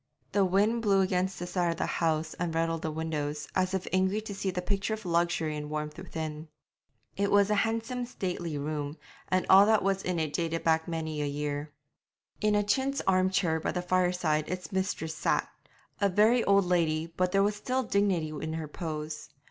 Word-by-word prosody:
The 200 - +3
wind 205 +5 +2
blew 200 -3 +3
against 185 0 0
this 175 0 -6
side 175 -2 +1
of 165 - -2
the - - 0
house 160 -1 0
and 170 -2 -2
rattled 165 0 0
the 160 - -2
windows, 150 -2 -3
as 185 0 +1
if 190 - -2
angry 190 +2 +2
to 215 -1 -6
see 195 0 -2
the 180 - -2
picture 200 +3 -1
of 220 -1 -12
luxury 170 -2 +1
and 150 0 -5
warmth 150 0 -3
within. 160 -3 -5 0.7
It 200 0 0
was 205 0 +4
a 205 -1 +3
handsome 230 +2 -2
stately 175 -8 -3
room, 145 +1 -3 0.3
and 185 0 +1
all 195 +2 +8
that 220 -1 +4
was 195 0 +1
in 180 -2 -2
it 155 -2 -1
dated 165 -1 -1
back 160 0 +2
many 160 -2 -3
a 145 - 0
year. 145 +1 -3 0.7
In 210 0 +3
a 205 - +3
chintz 265 +7 0
arm 185 0 +3
chair 175 -4 +1
by - - -2
the 180 - -2
fireside 180 -4 +1
its 185 0 -5
mistress 190 -4 -2
sat - - 0 0.5
a 200 -2 +3
very 220 +6 +4
old 200 -1 +4
lady, 165 -2 +1
but 180 0 +1
there 195 0 +4
was 205 +1 +1
still 255 +5 -1
dignity 200 -7 +1
in 155 +1 -4
her 160 -1 -4
pose. 155 -1 -5
180 Hz, 200 wpm, -29 LUFS, 160-200 Hz, 0.7 s, all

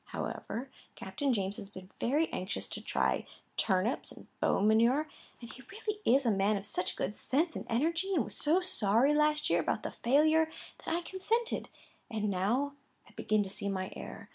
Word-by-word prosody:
However, 255 +4 -5 0.2
Captain 285 -3 -2
James 200 -3 -1
has 200 -3 -7
been 185 -1 -11
very 295 +7 +2
anxious 185 +2 -3
to - - -5
try - - 0 0.3
turnips 190 +4 +1
and - - -12
bone 205 - +2
manure, 235 +8 +4 0.3
and 235 -1 -10
he 260 - -12
really 425 0 -4
is 270 - +4
a 230 - +4
man 200 +1 +2
of 195 - -6
such 185 -1 -1
good 205 - -2
sense 315 +5 0
and - - -5
energy, 335 +11 +1
and 285 - +3
was 210 - -7
so 325 +5 +3
sorry 245 - +3
last 300 0 +3
year - - +3
about - - -1
the - - -3
failure, 310 +5 +3 0.3
that 325 - -1
I 345 - 0
consented; 450 +7 -1 0.4
and 215 -3 -1
now 235 +10 +1 0.3
I - - -18
begin 215 -1 +1
to 195 - -5
see 200 0 -2
my 185 -1 -3
error. - - -8
245 Hz, 190 wpm, -32 LUFS, 205-310 Hz, 0.4 s, manure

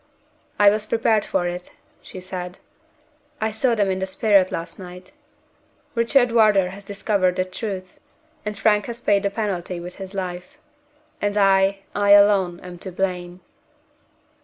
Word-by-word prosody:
"I 205 -1 +6
was 215 0 -2
prepared 225 -2 +2
for 175 - -1
it," 175 0 -5 0.3
she 185 - -10
said. 180 0 -7 0.8
"I 220 -1 -1
saw 235 +2 +1
them 200 -3 +1
in 190 - -2
the 190 - -2
spirit 195 -1 +3
last 165 - -5
night. 180 0 -11 0.8
Richard 240 +1 +3
Wardour 210 -5 +4
has 195 +2 -10
discovered 200 -2 0
the 185 - 0
truth; 185 -1 -6 0.4
and 210 -1 -5
Frank 210 -2 +2
has 235 0 -6
paid 205 -4 +2
the 200 - 0
penalty 190 -4 -3
with 180 +1 -9
his 195 0 -8
life 180 +6 -5 0.6
and 205 0 -1
I, 195 0 +3
I 205 0 +4
alone, 200 -4 +4
am 180 -1 -10
to 190 - -8
blame." 180 -1 -3
195 Hz, 155 wpm, -22 LUFS, 180-210 Hz, 0.8 s, I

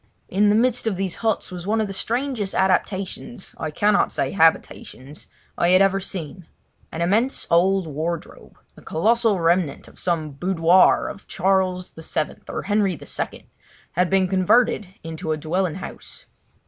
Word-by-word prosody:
In 205 +2 +3
the 205 - +4
midst 245 +1 +2
of 215 - 0
these 190 -1 -3
huts 220 -4 -1
was 180 0 -7
one 220 +2 +1
of 220 - +1
the 195 - -6
strangest 235 -1 -2
adaptations—I 190 0 -2
cannot 205 +7 +2
say - - -1
habitations—I 160 -1 -1
had 185 +1 +6
ever 195 0 +2
seen. 180 -2 -7 0.4
An 165 - -2
immense 220 +9 +1
old 185 +2 +3
wardrobe, 160 +2 -5 0.2
the - - -16
colossal 220 +3 +1
remnant 170 -3 +1
of - - -16
some 165 -4 -1
boudoir 175 +3 +3
of 200 - -9
Charles 185 -1 0
VII, 160 -1 -4
or - - -4
Henry 200 -5 0
II, - - -6 0.4
had 180 +1 +1
been 190 -1 +3
converted 205 +3 +2 0.2
into 160 0 -4
a - - -3
dwelling 165 +2 -1
house. 190 - -9
185 Hz, 145 wpm, -22 LUFS, 170-205 Hz, 0.4 s, had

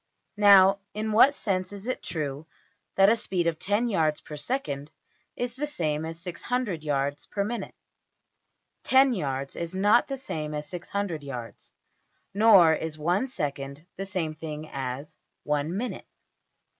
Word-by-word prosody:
Now 200 -1 +7 0.2
in 215 +1 -2
what 260 +7 +6
sense 185 -5 -2
is 200 0 -9
it 255 - -2
true 150 -2 -4 0.5
that 195 0 +6
a 220 - +5
speed 185 -6 -2
of 165 -2 0
$10$~yards 200 -8 +1
per 150 - -9
second 145 - -3 0.5
is 245 -1 -3
the 290 +4 -3
same 155 - -2
as 165 0 -6
$600$~yards 155 - -2
per 200 - -1
minute? 235 +4 -4 1.1
Ten 265 0 +5
yards 135 - -3
is 170 +2 -5
not 205 +5 +4
the 275 - -3
same 155 - -4
as 150 0 -4
$600$~yards, 160 -10 -5 0.6
nor 200 -6 +7
is 160 -1 -3
one 175 - +1
second 140 - -4
the 195 +1 -5
same 170 -5 -2
thing 155 0 -7
as 135 +2 -5 0.2
one 150 +4 -1
minute. 245 +3 -4
175 Hz, 140 wpm, -27 LUFS, 150-210 Hz, 1.1 s, Now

